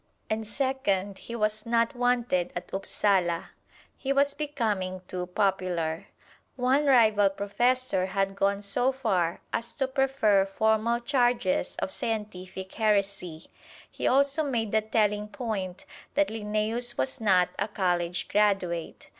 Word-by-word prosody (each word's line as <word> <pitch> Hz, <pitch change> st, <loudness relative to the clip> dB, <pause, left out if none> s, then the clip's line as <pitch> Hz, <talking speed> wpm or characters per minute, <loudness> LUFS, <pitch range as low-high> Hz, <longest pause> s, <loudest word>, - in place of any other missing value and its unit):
And 220 Hz, 0 st, -1 dB
second, 210 Hz, -6 st, -1 dB
he 235 Hz, -, -7 dB
was 215 Hz, -1 st, 0 dB
not 230 Hz, 0 st, +1 dB
wanted 240 Hz, -7 st, +1 dB
at 175 Hz, -, -6 dB
Upsala. 190 Hz, -3 st, 0 dB, 0.4 s
He 270 Hz, -, -3 dB
was 280 Hz, +1 st, +3 dB
becoming 210 Hz, -11 st, -2 dB
too 180 Hz, -1 st, -4 dB
popular. 180 Hz, -4 st, -1 dB, 0.5 s
One 265 Hz, +3 st, +2 dB
rival 215 Hz, -6 st, +5 dB
professor 205 Hz, +1 st, 0 dB
had 195 Hz, 0 st, -1 dB
gone 200 Hz, +1 st, 0 dB
so 245 Hz, +6 st, +1 dB
far 195 Hz, -11 st, -1 dB
as 230 Hz, 0 st, 0 dB
to 265 Hz, +2 st, -1 dB
prefer 260 Hz, -7 st, +2 dB
formal 220 Hz, +3 st, +1 dB
charges 240 Hz, -8 st, +1 dB
of -, -, -2 dB
scientific 190 Hz, -4 st, -5 dB
heresy; 200 Hz, -6 st, 0 dB, 0.5 s
he -, -, -2 dB
also 280 Hz, +3 st, +3 dB
made 235 Hz, -8 st, -1 dB
the 220 Hz, -, +3 dB
telling 210 Hz, -1 st, +1 dB
point 200 Hz, -4 st, -4 dB, 0.3 s
that 295 Hz, 0 st, +3 dB
Linnæus 220 Hz, +3 st, -2 dB
was 265 Hz, -2 st, -2 dB
not 185 Hz, -4 st, +4 dB
a -, -, 0 dB
college 180 Hz, -4 st, -1 dB
graduate. 195 Hz, -5 st, 0 dB
210 Hz, 130 wpm, -27 LUFS, 190-240 Hz, 0.5 s, rival